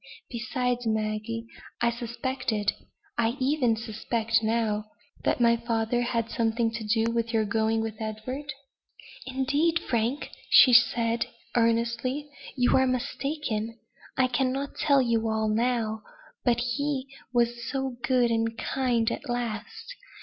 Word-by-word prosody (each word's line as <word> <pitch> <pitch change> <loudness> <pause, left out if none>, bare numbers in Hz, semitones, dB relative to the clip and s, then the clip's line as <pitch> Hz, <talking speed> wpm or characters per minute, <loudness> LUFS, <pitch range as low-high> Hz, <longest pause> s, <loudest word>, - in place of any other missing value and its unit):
Besides, 245 -1 -1
Maggie, 220 +1 -1 0.3
I 235 0 +3
suspected 235 -2 -2 0.5
I 235 +2 +1
even 260 -3 +2
suspect 225 0 -1
now 220 -1 0 0.4
that - - +1
my 235 -1 +5
father 230 0 0
had 230 -1 -1
something 225 0 +1
to 230 -1 -5
do 225 +2 +1
with 230 0 -1
your 220 -2 +2
going 220 +1 +1
with 220 -1 -5
Edward?" 255 +7 -4 0.8
"Indeed, 285 +6 +1
Frank!" 240 0 -1 0.2
said 235 -2 +6
she, - - 0 0.3
earnestly, 235 +4 +1 0.3
"you 245 -1 +3
are 260 0 +4
mistaken; 255 -3 -2 0.4
I 260 - +5
cannot 260 +2 -1
tell 280 -2 +3
you 230 -2 +1
all 220 0 0
now; 225 -1 0 0.4
but 240 -2 +3
he 270 +2 -1 0.3
was 240 -1 +1
so 265 -2 -2
good 250 -2 +2
and 225 0 0
kind 240 -3 0
at 285 - -5
last. 240 - -4
235 Hz, 130 wpm, -27 LUFS, 225-255 Hz, 0.8 s, said